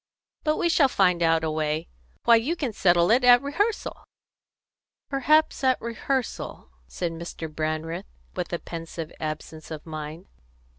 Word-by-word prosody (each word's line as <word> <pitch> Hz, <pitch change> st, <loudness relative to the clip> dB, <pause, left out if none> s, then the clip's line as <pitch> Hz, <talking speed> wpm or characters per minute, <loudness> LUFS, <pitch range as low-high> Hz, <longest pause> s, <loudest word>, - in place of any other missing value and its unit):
"But 305 Hz, 0 st, +1 dB
we -, -, +2 dB
shall 320 Hz, -4 st, +5 dB
find 180 Hz, -8 st, +2 dB
out 165 Hz, -1 st, +3 dB
a 160 Hz, -, 0 dB
way. 155 Hz, +1 st, -1 dB, 0.4 s
Why, 235 Hz, -, +7 dB
you 250 Hz, +9 st, +1 dB
can 270 Hz, -9 st, -3 dB
settle 175 Hz, -1 st, +4 dB
it 250 Hz, +3 st, +4 dB
at 245 Hz, +1 st, +7 dB
rehearsal!" 410 Hz, +11 st, -1 dB, 1.1 s
"Perhaps 300 Hz, +3 st, +3 dB
at 260 Hz, -1 st, +3 dB
rehearsal," 235 Hz, -, -3 dB, 0.2 s
said 170 Hz, -, -3 dB
Mr. 165 Hz, 0 st, -6 dB
Brandreth, 155 Hz, -, -3 dB, 0.3 s
with -, -, -3 dB
a -, -, 0 dB
pensive 165 Hz, -1 st, -7 dB
absence 155 Hz, +1 st, -6 dB
of 155 Hz, -2 st, -7 dB
mind. 155 Hz, +2 st, -7 dB
175 Hz, 145 wpm, -26 LUFS, 160-260 Hz, 1.1 s, Why